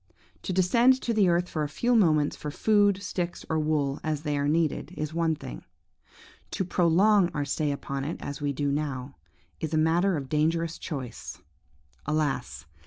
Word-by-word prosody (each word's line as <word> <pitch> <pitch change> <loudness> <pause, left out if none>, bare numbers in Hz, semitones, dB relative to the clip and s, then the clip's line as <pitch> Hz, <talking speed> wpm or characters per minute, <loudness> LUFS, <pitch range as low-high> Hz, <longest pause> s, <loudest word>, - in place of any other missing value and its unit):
To - - -4
descend 235 +8 +4
to 235 - -1
the 205 -4 +4
earth 175 +1 +2
for 155 - -3
a 150 - -1
few 240 +10 +1
moments 155 -8 +3
for 150 - -6
food, 205 +3 +2
sticks, 175 -2 -4
or 160 - +1
wool, 150 -3 0
as 155 -1 -2
they 150 -2 -1
are 140 0 0
needed, 155 0 0
is 155 0 -3
one 165 -1 +1
thing; - - -9 0.9
to 190 - -2
prolong 185 +3 +3
our 145 -1 -1
stay 145 +1 -1
upon 140 -1 -4
it, 155 - -3
as 145 +1 -6
we 145 -1 0
do 140 +1 -1
now, 140 -2 -3 0.4
is 160 0 -2
a - - +2
matter 170 +3 +2
of 135 -2 -5
dangerous 160 +3 0
choice. 130 -6 -6 0.7
Alas! 150 - -1
155 Hz, 175 wpm, -27 LUFS, 145-180 Hz, 0.9 s, descend